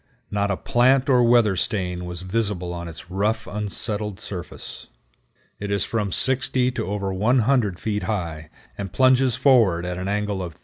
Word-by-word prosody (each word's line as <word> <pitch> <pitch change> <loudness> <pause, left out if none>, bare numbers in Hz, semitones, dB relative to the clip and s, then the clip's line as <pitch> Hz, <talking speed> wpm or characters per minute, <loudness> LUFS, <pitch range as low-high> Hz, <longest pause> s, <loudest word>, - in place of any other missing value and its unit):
Not 100 0 0
a 100 - 0
plant 130 +3 +3
or 125 -2 +5
weather 120 -4 +4
stain 90 -2 -1
was 90 0 -6
visible 95 -3 -2
on 85 0 -6
its 85 +2 -11
rough, 105 +4 0
unsettled 105 0 -3
surface. 90 -5 -7 0.7
It 105 - -4
is 100 -1 0
from 105 -4 -2
60 130 +2 +1
to 120 - -4
over 100 -1 -2
100 110 -1 +2
feet 105 -2 -2
high, 80 -7 -3 0.3
and 100 -2 -4
plunges 130 -1 +4
forward 115 -10 +4
at 90 0 -4
an 95 - -4
angle 105 -1 -1
of 85 -3 -6
38°. - - -28
105 Hz, 170 wpm, -23 LUFS, 90-120 Hz, 0.7 s, or